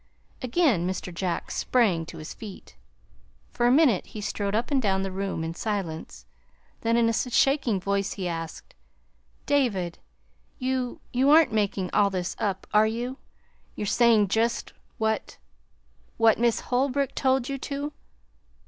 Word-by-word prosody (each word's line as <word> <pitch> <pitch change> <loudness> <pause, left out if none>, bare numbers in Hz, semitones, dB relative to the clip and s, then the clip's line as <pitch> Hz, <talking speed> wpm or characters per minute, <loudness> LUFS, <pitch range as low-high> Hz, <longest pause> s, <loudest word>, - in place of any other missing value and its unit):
Again 255 - +2
Mr. 185 -1 -4
Jack 175 0 -3
sprang 190 -10 +1
to - - -9
his 155 - -7
feet. 210 -4 -11 0.8
For 240 - +1
a - - +5
minute 265 - +4
he 215 - -8
strode 205 0 -2
up 235 +6 -1
and 275 -2 +3
down 190 -3 +1
the 195 - -3
room 190 -3 -3
in 165 +1 -3
silence; 180 -5 -4 0.5
then 230 +1 +1
in 235 -1 +4
a 230 - +2
shaking 250 -2 +2
voice 200 +1 -1
he 190 -3 -4
asked: 165 -1 -6 0.7
"David, 210 -12 0 0.6
you 255 -1 -2
you 260 +3 +3
aren't 310 -4 +6
making 200 -3 0
all 205 -1 +4
this 185 -2 -3
up, 195 -3 -2
are 215 +1 +5
you? 240 +4 -3 0.6
You're 210 - -3
saying 220 -1 +4
just 230 +3 0 0.2
what 220 0 -1 0.8
what 225 -1 +4
Miss 235 -1 +2
Holbrook 270 +2 0
told 260 -2 +1
you 275 -1 -3
to?" 285 +2 -4
220 Hz, 150 wpm, -26 LUFS, 195-255 Hz, 0.8 s, aren't